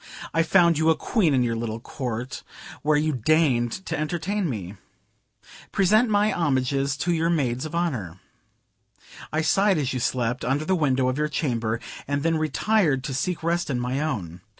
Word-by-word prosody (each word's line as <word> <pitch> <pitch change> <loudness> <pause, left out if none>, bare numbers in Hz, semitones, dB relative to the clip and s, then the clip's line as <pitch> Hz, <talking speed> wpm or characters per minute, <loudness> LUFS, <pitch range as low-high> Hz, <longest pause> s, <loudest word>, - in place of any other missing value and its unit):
I 165 - +3
found 170 -1 +4
you 160 +1 +3
a 160 - +5
Queen 195 -6 +1
in 130 -2 +3
your 115 -1 0
little 115 -1 -3
court, 125 0 -5 0.4
where 150 0 +2
you 155 +1 +1
deigned 130 - +1
to - - -2
entertain 175 +5 -2
me. 100 -5 -5 0.9
Present 215 +5 +3
my 210 0 +3
homages 135 -2 0
to 175 +4 0
your 165 0 +1
maids 135 -4 0
of 155 - -7
honor. 120 - -2 1.1
I 155 - 0
sighed 195 +3 +3
as 140 -3 -1
you 130 - -2
slept, 125 0 -1
under 140 +4 0
the 190 - +1
window 135 -7 +2
of 130 +3 -1
your 150 0 0
chamber, 115 -7 -1 0.3
and 145 0 -1
then 165 -1 +1
retired 155 -2 +1
to 135 -1 -4
seek 170 +6 -2
rest 170 0 0
in 125 -3 -1
my 125 +2 -2
own. 95 - -3
145 Hz, 175 wpm, -24 LUFS, 125-165 Hz, 1.1 s, a